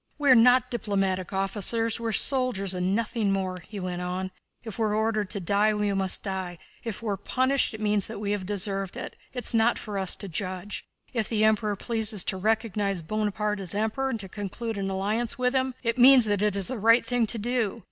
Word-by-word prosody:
"We 290 -2 +3
are - - +9
not 250 +2 +5
diplomatic 195 -5 -1
officials, 210 +4 0
we 230 - -3
are - - 0
soldiers 245 -6 +2
and 185 +2 0
nothing 225 -2 0
more," 185 -2 -2
he 200 +4 -9
went 180 -1 -4
on. 185 +1 -3 0.3
"If 225 -1 -8
we 225 - +2
are 210 0 0
ordered 215 -2 0
to 205 - -2
die, 205 +4 +2
we 210 -1 0
must 190 -1 +2
die. 190 -3 -4 0.3
If 230 -1 -6
we're 205 -3 -1
punished, 260 +5 0
it - - -9
means 210 -2 +1
that 225 - -7
we 205 0 -3
have 205 -2 -1
deserved 195 -1 -2
it, - - -7 0.2
it's 250 -1 -4
not 230 +1 +3
for 205 -3 -5
us 190 -1 +3
to 200 - -8
judge. 185 +3 -5 0.3
If 225 -5 -1
the 215 -2 +1
Emperor 215 -1 +2
pleases 220 -2 +1
to 190 - -2
recognize 205 -3 -1
Bonaparte 210 +2 -2
as 190 -1 -4
Emperor 220 +6 -1
and 230 -4 -3
to 195 - -8
conclude 205 +3 -5
an 195 0 -2
alliance 215 +7 -2
with 250 0 +1
him, 260 -1 0
it 230 +1 -1
means 255 -1 +8
that 205 -2 0
that 210 -1 +1
is 200 -1 +1
the 255 +1 -4
right 230 +3 +5
thing 245 -2 +1
to 230 - -2
do. 235 -1 -1
210 Hz, 220 wpm, -26 LUFS, 195-230 Hz, 0.3 s, are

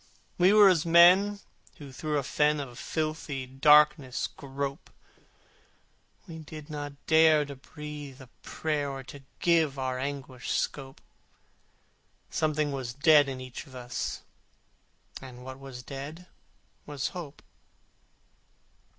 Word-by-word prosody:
We 180 +2 +6
were 210 -1 +8
as 175 -5 +4
men 180 +4 +6 0.4
who 145 -4 -10
through 150 +3 -2
a 140 - -1
fen 150 +2 +1
Of 125 -4 -7
filthy 155 -4 -3
darkness 145 0 +4
grope: 140 +2 -6 1.4
We 165 -2 -8
did 155 0 -10
not 145 -1 -5
dare 160 -2 +5
to 140 0 -8
breathe 145 0 -9
a 130 - -11 0.2
prayer, 150 -3 -2
Or 135 -1 -6
to 140 +2 -11 0.2
give 160 -5 +2
our 130 -1 -2
anguish 135 -2 -5
scope: 135 -2 -3 1.3
Something 155 -1 0
was 130 -3 -5
dead 145 0 +5
in 130 -1 -5
each 130 +3 -8
of 130 - -14
us, 120 -1 -5 1.0
And 125 -2 -11
what 130 +1 -9
was 135 -2 -10
dead 145 +6 -8 0.6
was 145 -2 -3
Hope. 165 -6 -9
145 Hz, 125 wpm, -28 LUFS, 135-155 Hz, 1.4 s, were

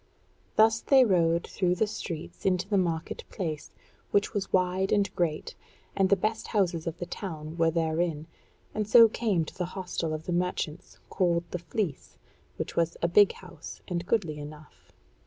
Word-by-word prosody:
Thus 225 +1 +5
they 265 -2 +5
rode 170 -4 +2
through 180 -2 0
the 220 - +2
streets 170 -6 -6
into 185 -1 +1
the 205 - 0
market 165 -3 -2
place, 160 -6 -4 0.4
which 200 +2 +1
was 200 -2 -3
wide 185 +1 +1
and 205 -1 +1
great, 165 -3 -1 0.4
and 190 -1 +3
the 200 - +6
best 215 +4 -2
houses 175 -6 0
of 165 0 -3
the 175 - -4
town 160 -5 -6
were 165 -1 +3
therein, 160 -1 0 0.5
and 215 -1 -2
so 230 +1 +9
came 210 -7 0
to - - -11
the 180 - -2
hostel 180 -3 -3
of 155 0 -4
the 175 - -2
Merchants, 175 -2 -2
called 175 -3 +1
the 180 - -3
Fleece, 170 -2 -4 0.4
which - - -5
was 170 0 +1
a - - +4
big 200 +3 +5
house, 180 -4 -11
and 175 -1 -3
goodly 170 -10 0
enough. 150 +1 -12
175 Hz, 175 wpm, -28 LUFS, 165-195 Hz, 0.5 s, so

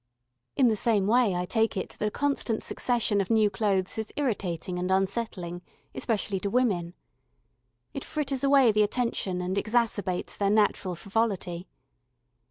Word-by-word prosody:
In 265 - +4
the 220 - +3
same 210 -2 +2
way 225 -2 +3
I 180 0 -1
take 225 +2 0
it 185 - -4
that - - 0
a - - +1
constant 275 -3 -1
succession 230 -4 0
of 190 - -4
new 215 -2 +3
clothes 195 0 0
is 220 - -4
irritating 185 - -2
and 180 +1 -2
unsettling, 190 -2 -1 0.3
especially 210 -4 -1
to 200 - -2
women. 195 -8 0 1.0
It 275 - -5
fritters 280 -4 -3
away 275 -4 +5
the 215 0 +2
attention 205 -4 -1
and 185 +1 -2
exacerbates 215 -5 0
their 200 -1 +2
natural 205 -3 +2
frivolity. 190 -2 -2
210 Hz, 150 wpm, -27 LUFS, 185-235 Hz, 1.0 s, away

